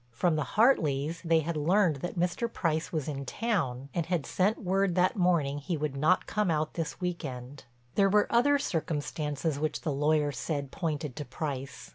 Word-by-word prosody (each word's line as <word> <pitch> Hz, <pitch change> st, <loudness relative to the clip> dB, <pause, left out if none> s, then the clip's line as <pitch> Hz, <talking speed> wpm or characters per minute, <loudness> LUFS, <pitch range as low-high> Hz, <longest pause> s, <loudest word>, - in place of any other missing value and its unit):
From 155 Hz, +8 st, +1 dB
the 155 Hz, -, -3 dB
Hartleys 165 Hz, -, +3 dB
they 165 Hz, -1 st, +3 dB
had 165 Hz, +2 st, -3 dB
learned 165 Hz, +1 st, +3 dB
that 175 Hz, +6 st, -5 dB
Mr. 180 Hz, +7 st, 0 dB
Price 160 Hz, -5 st, -1 dB
was 155 Hz, -5 st, -2 dB
in 140 Hz, -2 st, -3 dB
town, 140 Hz, -, -2 dB
and 170 Hz, -2 st, -1 dB
had 175 Hz, -5 st, 0 dB
sent 200 Hz, +4 st, +1 dB
word 190 Hz, -1 st, +1 dB
that 185 Hz, +3 st, +3 dB
morning 170 Hz, -7 st, +2 dB
he 165 Hz, +3 st, -3 dB
would 150 Hz, -2 st, -2 dB
not 155 Hz, +7 st, +3 dB
come 210 Hz, -3 st, 0 dB
out 155 Hz, -1 st, 0 dB
this 165 Hz, -2 st, -4 dB
week 180 Hz, -1 st, -3 dB
end. 130 Hz, 0 st, -7 dB, 0.3 s
There 195 Hz, -1 st, +4 dB
were 205 Hz, +1 st, +4 dB
other 285 Hz, +5 st, +4 dB
circumstances 150 Hz, -, -2 dB
which 155 Hz, 0 st, -2 dB
the 155 Hz, -, -1 dB
lawyer 150 Hz, +1 st, +2 dB
said 140 Hz, -1 st, -3 dB
pointed 150 Hz, -7 st, -3 dB
to 150 Hz, -, -4 dB
Price. 135 Hz, 0 st, -5 dB
155 Hz, 185 wpm, -29 LUFS, 145-180 Hz, 0.3 s, There